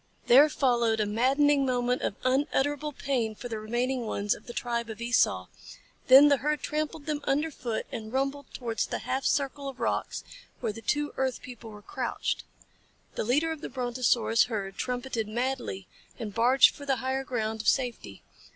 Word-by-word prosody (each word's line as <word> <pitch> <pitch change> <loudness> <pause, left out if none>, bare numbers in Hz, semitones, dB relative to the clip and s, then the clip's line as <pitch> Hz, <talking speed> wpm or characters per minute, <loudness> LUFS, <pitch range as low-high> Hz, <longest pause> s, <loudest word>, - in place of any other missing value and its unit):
There 280 +5 +7
followed 235 -6 +2
a 215 - +2
maddening 275 +7 +3
moment 250 -1 0
of - - -2
unutterable 285 +3 +1
pain 250 -6 -2
for 245 - -7
the 220 -2 -4
remaining 240 +2 -1
ones 205 -1 0
of - - -12
the - - -6
tribe 235 -1 -2
of 220 - -7
Esau, 230 - +2 0.6
then 270 +3 +9
the 285 -1 +4
herd 295 +1 -1
trampled 305 0 -3
them 300 -1 -2
underfoot 275 -6 -1
and 220 -1 -6
rumbled 275 +2 -1
towards 230 -3 -2
the - - -2
half 265 +1 -1
circle 280 0 0
of 265 - -11
rocks - - -2 0.4
where 225 -4 -2
the 225 - -9
two 295 +4 -1
earth 260 -1 -1
people 240 -3 -10
were 210 -1 -12
crouched. - - -3 0.7
The - - -2
leader 290 +9 +1
of 315 -2 -6
the - - -5
Brontosaurus 240 -3 +2
herd 200 -5 -4
trumpeted 245 -2 -3
madly 235 - -3 0.3
and 210 -3 -6
barged 245 +4 +5
for 285 - -11
the 270 - +3
higher 260 +2 -2
ground 220 -4 -2
of - - -7
safety. 250 -3 -1
250 Hz, 175 wpm, -28 LUFS, 225-275 Hz, 0.7 s, then